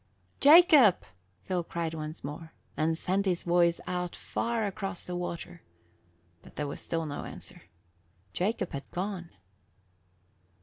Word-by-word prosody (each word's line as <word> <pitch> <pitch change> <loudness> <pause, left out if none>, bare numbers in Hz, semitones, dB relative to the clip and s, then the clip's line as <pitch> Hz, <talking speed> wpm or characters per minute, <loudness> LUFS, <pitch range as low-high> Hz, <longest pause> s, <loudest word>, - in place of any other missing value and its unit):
"Jacob!" 295 - +7 0.4
Phil 180 -2 -1
cried 165 -1 -3
once 155 0 -6
more, 160 +2 -7 0.2
and 160 +1 +1
sent 195 +3 0
his 180 -2 +1
voice 170 -1 +3
out 180 -1 -3
far 230 -2 -2
across 195 -2 -4
the 180 - -4
water. 175 -1 -5 0.8
But - - -16
there 150 - -2
was 140 - -5
still 165 -1 -2
no 145 -2 -5
answer. - - -9 0.7
Jacob 195 0 -1
had 140 -1 -6
gone. 180 -2 -4
175 Hz, 130 wpm, -29 LUFS, 165-195 Hz, 0.8 s, Jacob